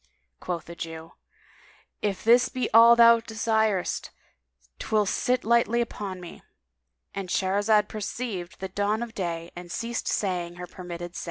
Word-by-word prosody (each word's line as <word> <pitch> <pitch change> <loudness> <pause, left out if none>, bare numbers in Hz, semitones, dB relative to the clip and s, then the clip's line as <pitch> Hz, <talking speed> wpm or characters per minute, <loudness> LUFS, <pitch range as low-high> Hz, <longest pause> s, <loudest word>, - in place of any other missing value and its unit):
'" - - -49
Quoth 175 -2 -4
the 170 - -9
Jew, 165 -1 -8 0.9
"If 195 -3 -2
this 240 +2 +5
be 255 - -2
all 230 +1 +9
thou 235 0 +7
desirest 220 -3 -1 0.7
'twill 215 -1 +1
sit 250 +5 0
lightly 235 +1 +3
upon 205 -5 -4
me." 175 -1 -11 0.7
—And 195 -2 -5
Shahrazad 205 +3 +2
perceived 210 -4 -5
the 190 - -4
dawn 205 +4 0
of 235 -1 -8
day 170 -4 -4
and 175 0 -9
ceased 230 +4 -3
sayi 175 -3 -2
205 Hz, 135 wpm, -26 LUFS, 180-230 Hz, 0.9 s, all